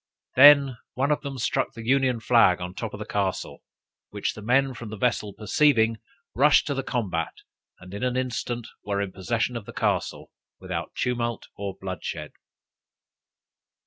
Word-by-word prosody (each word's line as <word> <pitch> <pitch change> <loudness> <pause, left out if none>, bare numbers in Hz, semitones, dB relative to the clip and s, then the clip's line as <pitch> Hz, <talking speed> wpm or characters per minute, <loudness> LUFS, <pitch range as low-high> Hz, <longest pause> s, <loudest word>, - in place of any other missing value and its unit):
Then 140 -2 +7 0.2
one 140 +3 +1
of 150 - +1
them 140 -2 -6
struck 130 +2 -1
the 115 -3 -9
union 130 -2 +2
flag 115 -7 +4
on 90 0 -5
the - - -20
top - - -5
of - - -10
the - - -5
castle, - - -2 0.5
which - - -3
the 110 - -10
men 130 +5 +2
from 115 -2 -8
the 110 - -7
vessel 105 -2 0
perceiving, 115 +1 +2 0.4
rushed 145 +4 +5
to 145 - -1
the 135 - -2
combat, 95 - -3 0.4
and 90 +1 -12
in 100 - -5
an 125 0 0
instant 120 -2 -3 0.2
were 100 -1 -2
in 100 -1 -2
possession 115 +6 -2
of 115 -3 -6
the - - -8
castle, - - -1 0.3
without - - -5
tumult 120 -2 -2
or 100 -1 -5
bloodshed. 95 -3 -5
120 Hz, 170 wpm, -25 LUFS, 100-130 Hz, 0.5 s, Then